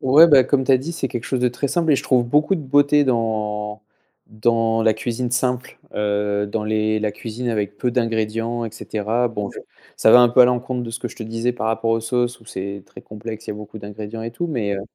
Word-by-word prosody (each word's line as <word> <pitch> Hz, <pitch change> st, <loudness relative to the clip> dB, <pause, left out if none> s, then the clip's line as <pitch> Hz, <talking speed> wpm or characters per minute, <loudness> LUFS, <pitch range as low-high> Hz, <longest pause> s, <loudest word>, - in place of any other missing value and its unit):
ouais 145 Hz, +6 st, +7 dB
beh 135 Hz, -5 st, +6 dB
comme 135 Hz, -2 st, +2 dB
tu 135 Hz, -, +3 dB
as 130 Hz, -, +5 dB
dit 160 Hz, +6 st, -5 dB
c'est 135 Hz, -, -3 dB
quelque 120 Hz, -2 st, -5 dB
chose 130 Hz, -2 st, -1 dB
de 125 Hz, -, +3 dB
très 130 Hz, +3 st, -3 dB
simple 165 Hz, 0 st, +1 dB
et -, -, +4 dB
je -, -, -3 dB
trouve 125 Hz, -2 st, +2 dB
beaucoup 150 Hz, +9 st, +2 dB
de 165 Hz, -, -4 dB
beauté 145 Hz, +1 st, +3 dB
dans 105 Hz, -3 st, -1 dB, 0.5 s
dans 115 Hz, +1 st, +1 dB
la 110 Hz, -1 st, +4 dB
cuisine 120 Hz, +2 st, -3 dB
simple, 125 Hz, 0 st, -1 dB, 0.2 s
heu, 105 Hz, 0 st, 0 dB
dans 105 Hz, +1 st, -3 dB
les 110 Hz, 0 st, 0 dB
la 105 Hz, -1 st, -1 dB
cuisine 115 Hz, +3 st, -5 dB
avec 105 Hz, -2 st, -2 dB
peu 125 Hz, -, 0 dB
d'ingrédients 115 Hz, 0 st, -1 dB
et 115 Hz, -, -5 dB
cetera. 115 Hz, +2 st, -1 dB
Bon 105 Hz, -3 st, -4 dB
je -, -, -10 dB, 0.4 s
ça 110 Hz, -, +4 dB
va 125 Hz, -, +9 dB
un 120 Hz, -, +6 dB
peu 125 Hz, +2 st, +4 dB
à -, -, +10 dB
l'encontre 125 Hz, 0 st, 0 dB
de 115 Hz, -, -6 dB
ce 115 Hz, -, -5 dB
que -, -, -4 dB
je -, -, -14 dB
te -, -, -6 dB
disais 115 Hz, +2 st, -2 dB
par 110 Hz, -2 st, -4 dB
rapport 115 Hz, 0 st, 0 dB
aux 115 Hz, -, +2 dB
sauces 120 Hz, +1 st, -1 dB
où -, -, -19 dB
c'est 100 Hz, -1 st, -6 dB
très -, -, -13 dB
complexe, 110 Hz, +1 st, -8 dB
il -, -, -4 dB
y -, -, -2 dB
a 105 Hz, -, -8 dB
beaucoup 105 Hz, +1 st, -9 dB
d'ingrédients 105 Hz, +2 st, -7 dB
et 115 Hz, -, -4 dB
tout 175 Hz, +9 st, -3 dB
mais, 110 Hz, -10 st, -2 dB
heu 95 Hz, -, -4 dB
115 Hz, 255 wpm, -21 LUFS, 110-125 Hz, 0.5 s, à